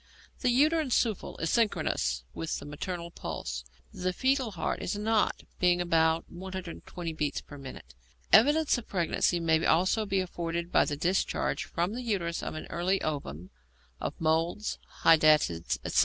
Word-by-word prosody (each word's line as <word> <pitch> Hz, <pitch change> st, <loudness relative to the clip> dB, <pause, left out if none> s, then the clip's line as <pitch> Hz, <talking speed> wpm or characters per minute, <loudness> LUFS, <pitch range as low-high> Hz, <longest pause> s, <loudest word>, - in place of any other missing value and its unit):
The 250 Hz, -, +1 dB
uterine 300 Hz, +4 st, +3 dB
souffle 225 Hz, -4 st, 0 dB
is 165 Hz, -, -1 dB
synchronous 65 Hz, -, +1 dB
with 165 Hz, -, -3 dB
the -, -, -8 dB
maternal 170 Hz, +4 st, -5 dB
pulse; 65 Hz, -, -5 dB, 0.3 s
the 185 Hz, 0 st, -1 dB
foetal 260 Hz, +3 st, +1 dB
heart 170 Hz, -, -2 dB
is 205 Hz, -, -2 dB
not, 215 Hz, +1 st, +1 dB, 0.2 s
being 180 Hz, -1 st, +3 dB
about 165 Hz, -1 st, +2 dB
120 180 Hz, -2 st, -6 dB
beats 150 Hz, -2 st, -2 dB
per 145 Hz, -, -12 dB
minute. 130 Hz, -, -10 dB, 0.4 s
Evidence 290 Hz, +5 st, +5 dB
of 235 Hz, -, -12 dB
pregnancy 175 Hz, -1 st, +1 dB
may 160 Hz, -1 st, +2 dB
also 185 Hz, +6 st, +2 dB
be 195 Hz, -1 st, +1 dB
afforded 170 Hz, -1 st, -3 dB
by -, -, +4 dB
the 145 Hz, -, -3 dB
discharge 180 Hz, +5 st, 0 dB
from 175 Hz, +4 st, -2 dB
the 245 Hz, -, -4 dB
uterus 185 Hz, -8 st, -1 dB
of -, -, -5 dB
an 155 Hz, -, -6 dB
early 185 Hz, +3 st, +1 dB
ovum, 95 Hz, -, -4 dB, 0.5 s
of -, -, -4 dB
moles, 165 Hz, +6 st, 0 dB, 0.2 s
hydatids, 155 Hz, -, +4 dB
etc. -, -, +2 dB
175 Hz, 155 wpm, -29 LUFS, 160-205 Hz, 0.5 s, Evidence